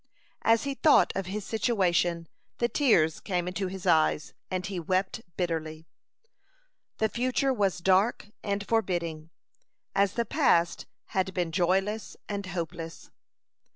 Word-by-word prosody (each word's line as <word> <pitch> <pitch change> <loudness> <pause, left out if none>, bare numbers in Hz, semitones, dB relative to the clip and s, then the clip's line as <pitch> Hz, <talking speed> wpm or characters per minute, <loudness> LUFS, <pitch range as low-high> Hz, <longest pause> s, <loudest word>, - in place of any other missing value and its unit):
As 225 0 +3
he 280 - -2
thought 295 +2 +4
of 195 -2 -2
his 200 +1 -4
situation, 180 -7 +1 0.3
the 235 - +2
tears 195 - +3
came 180 -3 -2
into 185 +1 -2
his 190 +1 -7
eyes, 155 -3 +2 0.2
and 185 -1 -2
he 195 -2 -3
wept 185 +6 -1 0.2
bitterly. 160 -3 -3 1.1
The 220 - +2
future 255 +4 0
was 200 -6 +1
dark 195 +4 +2
and 200 0 -2
forbidding, 170 -8 -1 0.6
as 200 0 +2
the 235 - 0
past 170 -4 +2 0.2
had 190 0 -1
been 175 -3 -1
joyless 195 +5 0
and 200 -2 -4
hopeless. 165 -2 -6
190 Hz, 130 wpm, -28 LUFS, 170-210 Hz, 1.1 s, thought